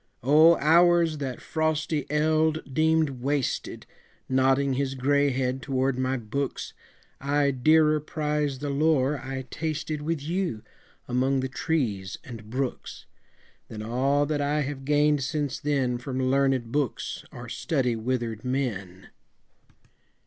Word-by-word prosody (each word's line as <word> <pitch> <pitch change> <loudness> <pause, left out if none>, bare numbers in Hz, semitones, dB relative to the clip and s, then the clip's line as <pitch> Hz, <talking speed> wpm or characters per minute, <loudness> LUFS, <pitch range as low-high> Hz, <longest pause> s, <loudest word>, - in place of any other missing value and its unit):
O 155 +6 +6
hours 165 0 +4
that 130 -3 -4
frosty 155 -1 -1
eld 155 -1 +1
deemed 155 -3 +2
wasted, 140 0 -2 0.4
Nodding 135 +1 +2
his 135 0 -1
gray 140 +2 +2
head 130 0 -1
toward 135 -1 0
my 130 +1 0
books, 125 +4 -4 0.5
I 140 +1 +1
dearer 155 +4 +4
prize 150 -2 -2
the 145 +1 -3
lore 145 -1 +2
I 135 0 -5
tasted 155 -1 -3
With 160 +1 -2
you, 165 - -2 0.4
among 130 +2 +1
the 130 - -2
trees 115 -11 -2
and 110 -4 -10
brooks, 130 +2 -4 0.6
Than 110 -1 -7
all 135 +5 +1
that 145 0 -1
I 145 +1 +1
have 135 -1 -5
gained 150 0 +3
since 140 0 -2
then 135 -5 0
From 130 +1 -5
learnèd 130 -2 +1
books 140 -3 -2
or - - -9
study 130 -7 -1
withered 115 -1 -3
men! 105 -9 -3
140 Hz, 125 wpm, -26 LUFS, 130-150 Hz, 0.6 s, O